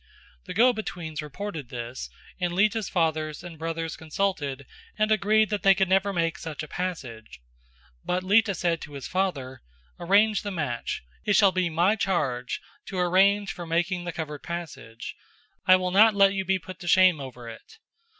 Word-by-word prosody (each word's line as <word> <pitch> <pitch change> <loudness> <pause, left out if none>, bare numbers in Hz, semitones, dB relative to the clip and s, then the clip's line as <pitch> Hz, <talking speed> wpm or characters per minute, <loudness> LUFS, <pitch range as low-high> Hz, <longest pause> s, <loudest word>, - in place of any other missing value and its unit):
The - - -7
go 245 +4 +5
betweens 170 -8 -5
reported 150 - -6
this, 120 +1 -6 0.3
and 175 -1 -1
Lita's 210 +2 +1
father 160 -3 0
and 170 -3 -10
brothers 165 -1 -3
consulted 155 -5 -2 0.3
and 215 0 +1
agreed 215 0 +3
that 205 -2 -1
they 195 +1 +6
could 190 -1 +2
never 195 +1 +3
make 165 -3 -1
such 155 -2 -6
a - - -7
passage, 130 - -5 0.6
but 180 +1 -1
Lita 205 +1 +3
said 170 -1 0
to 145 - -9
his 140 -2 -6
father: 140 -10 -2 0.4
"Arrange 205 +4 +3
the 205 - -4
match; 145 - -3 0.2
it 205 - +2
shall 200 -2 +6
be 185 -2 0
my 175 +6 +2
charge 135 - -1 0.3
to 190 - -5
arrange 195 +3 +3
for 175 -1 -8
making 175 +2 0
the 175 - -3
covered 150 -3 -6
passage; 165 -10 -7 0.5
I 185 - +9
will 185 -1 -1
not 215 +3 +6
let 195 -1 +5
you 190 -1 -2
be 190 +1 +2
put 185 0 -10
to 175 - -9
shame 185 -2 +5
over 125 -3 -9
it." 115 - -12
180 Hz, 175 wpm, -26 LUFS, 155-195 Hz, 0.6 s, I